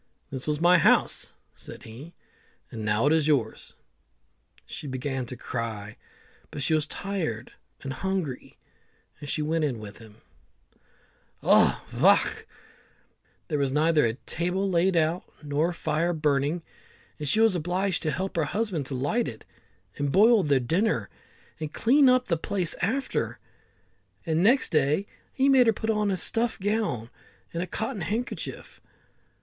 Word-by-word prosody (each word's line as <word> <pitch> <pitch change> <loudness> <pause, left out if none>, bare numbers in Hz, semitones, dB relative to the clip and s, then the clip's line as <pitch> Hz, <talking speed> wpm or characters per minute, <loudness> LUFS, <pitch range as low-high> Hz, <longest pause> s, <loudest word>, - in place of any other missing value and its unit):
"This 130 0 -6
was 150 -1 0
my 175 +1 +5
house," - - +2 0.2
said - - -11
he, 130 +10 -11 0.6
"and 110 - -6
now 105 +3 +1
it's 155 0 +3
yours." 125 -8 -1 0.9
She 150 - -8
began 130 -1 -3
to 125 - -7
cry, 110 -4 -5 0.5
but 145 - -5
she 160 - +2
was 155 -1 +1
tired 160 - -4 0.3
and 135 -1 -4
hungry, 180 -4 -4 0.6
and 145 -1 -8
she 150 - -1
went 160 +1 0
in 135 -6 0
with 105 -1 -10
him. 110 -1 -16 1.2
Ovoch! - - +3 1.0
there 150 - -1
was 140 -2 +1
neither 155 +2 +3
a 115 -1 +1
table 180 +7 -2
laid 180 0 +2
out, 165 +2 +1 0.2
nor 150 +3 0
a - - -4
fire 160 +3 0
burning, 150 +1 0 0.6
and 150 - -4
she 215 - +2
was 225 -4 +4
obliged 180 +3 -1
to 160 - -1
help 190 +5 -3
her 160 - +2
husband 185 - -2
to 135 - -3
light 145 - 0
it, 110 - -8 0.5
and 145 -1 -1
boil 220 - +6
their 145 -5 +2
dinner, 170 - 0 0.5
and 155 -1 -5
clean 270 +3 +5
up 255 0 +3
the 170 - 0
place 180 +1 0
after; 255 - -1 0.9
and 160 -1 +1
next 240 +8 +4
day 155 +4 +2 0.3
he 270 0 +1
made 260 -3 +6
her 225 - +5
put 220 +1 -1
on 210 -1 0
a 190 - 0
stuff 230 +5 0
gown 200 - -1 0.4
and 170 - -2
a 180 - -3
cotton 220 0 -4
handkerchief. 225 +8 -4
160 Hz, 150 wpm, -26 LUFS, 140-195 Hz, 1.2 s, boil